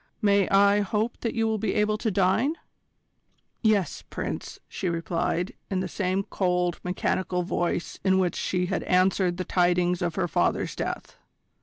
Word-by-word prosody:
May 200 -3 +3
I 200 +1 +5
hope 215 +3 -1
that 230 - -3
you 225 -1 +1
will 220 -1 0
be 205 -2 -1
able 210 0 +1
to 220 - 0
dine?" 200 - +2 1.1
"Yes, 210 -5 +1
Prince," - - -5
she 190 -4 -3
replied, 170 +1 -1 0.2
in 190 - 0
the 185 - -2
same 190 +1 -1
cold, 180 -3 0
mechanical 180 0 -1
voice 175 -1 -2
in 190 -1 +3
which 185 -2 +1
she 180 -1 -1
had 185 0 -1
answered 185 -1 +2
the 185 - -3
tidings 180 0 +2
of 175 -2 -1
her 185 -2 0
father's - - 0
death. - - -5
185 Hz, 160 wpm, -26 LUFS, 180-205 Hz, 1.1 s, I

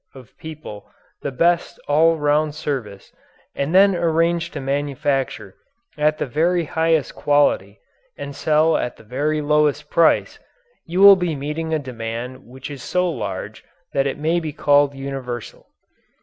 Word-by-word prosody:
of 130 -4 -15
people 155 -10 -9 0.3
the 140 - -3
best 170 +6 +1
all 160 +3 +4
round 150 0 +1
service 120 -11 -5 0.4
and 145 +5 -2
then 195 +1 +6
arrange 170 0 +1
to 150 - -7
manufacture 140 0 -2 0.4
at 150 0 +1
the - - -2
very 165 +6 +1
highest 160 -1 0
quality 145 0 +1 0.4
and 140 0 -7
sell 155 +2 +2
at 125 - -2
the - - -16
very 145 +7 -1
lowest 150 0 +1
price, 170 -1 +2 0.5
you 175 +3 -2
will 200 0 +10
be 175 -4 -2
meeting 150 +3 -4
a 160 - +2
demand 125 -1 -6
which 130 +3 -10
is 140 -3 -8
so 180 +7 0
large 105 - -5 0.3
that 135 0 +1
it 135 - -3
may 160 +3 +1
be 160 -2 -5
called 145 -1 +3
universal. 135 -4 -6
145 Hz, 150 wpm, -21 LUFS, 135-160 Hz, 0.5 s, will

